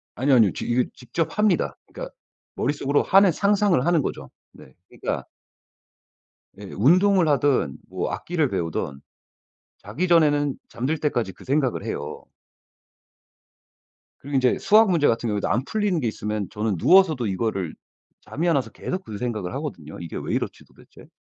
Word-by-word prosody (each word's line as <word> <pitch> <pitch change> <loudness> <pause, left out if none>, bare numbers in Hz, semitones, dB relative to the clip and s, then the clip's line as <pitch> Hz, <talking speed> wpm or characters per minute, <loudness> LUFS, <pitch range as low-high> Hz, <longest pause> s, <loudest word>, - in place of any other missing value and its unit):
아니요, 135 +2 +3
아니요. 110 -6 +5
저 - - -5
이거 120 +1 +2
직접 130 - -4
합니다. 210 -5 +2
그러니까 - - -8 0.4
머릿속으로 145 0 0
하는 195 -1 +5
상상을 200 -5 +2
하는 170 -2 +3
거죠. - - -5 0.2
네. 65 - -16
그러니까 - - -4 1.3
네 100 - -11
운동을 180 - +4
하든 140 - +1
뭐 - - -3
악기를 160 -5 -1
배우든 80 - -3 0.8
자기 180 +4 -3
전에는 145 -4 +3
잠들 135 +7 -2
때까지 120 -10 -1
그 - - -16
생각을 135 -2 0
해요. 70 - -5 2.0
그리고 140 0 -2
이제 130 -1 +2
수학 215 0 +5
문제 165 -5 +3
같은 115 +1 0
경우에도 105 -1 -1
안 120 - +1
풀리는 205 -3 0
게 125 - -1
있으면 105 -2 -3
저는 105 -1 -1
누워서도 160 - +4
이거를 95 -3 -2 0.5
잠이 170 +4 -2
안 165 - +3
와서 135 - -1
계속 185 +1 -5
그 105 - -7
생각을 110 -5 -3
하거든요. 135 - -6
'이게 85 -2 -6
왜 - - -4
이렇지 - - -3
도대체?' - - -18
140 Hz, 345 characters per minute, -24 LUFS, 110-170 Hz, 2.0 s, 아니요